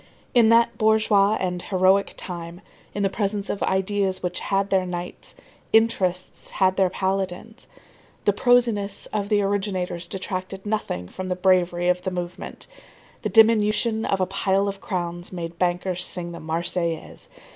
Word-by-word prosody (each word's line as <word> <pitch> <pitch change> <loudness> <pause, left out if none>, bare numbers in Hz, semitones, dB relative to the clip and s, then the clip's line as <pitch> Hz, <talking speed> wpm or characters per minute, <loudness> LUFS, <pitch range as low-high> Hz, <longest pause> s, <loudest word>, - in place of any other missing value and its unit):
In 235 -3 +5
that 230 +1 +4
bourgeois 215 -2 +4
and 180 -1 -2
heroic 190 +1 +2
time, 170 0 -6 0.3
in 205 - -1
the - - +4
presence 205 -1 -2
of 200 - -5
ideas 190 0 0
which 180 0 -2
had 195 0 -1
their 190 -1 +3
knights, 175 0 -6 0.4
interests 190 -5 +1
had 190 -1 +2
their 190 -1 +3
paladins. 190 +4 -3 0.6
The 205 - +4
prosiness 230 -3 +2
of 205 -1 -1
the 205 -2 +3
originators 190 -3 -2
detracted 190 0 -5
nothing 205 - -2
from 185 - -6
the 180 - -1
bravery 180 -1 +2
of 180 0 +2
the 185 - -2
movement. 180 -1 -6 0.6
The - - -2
diminution 220 0 +4
of 195 - 0
a 185 - +2
pile 195 +1 0
of 195 0 -5
crowns 175 -3 -4
made 170 -2 -6
bankers 180 0 0
sing 175 -2 -1
the 170 - -8
Marseillaise. 165 +1 -3
190 Hz, 150 wpm, -24 LUFS, 180-205 Hz, 0.6 s, In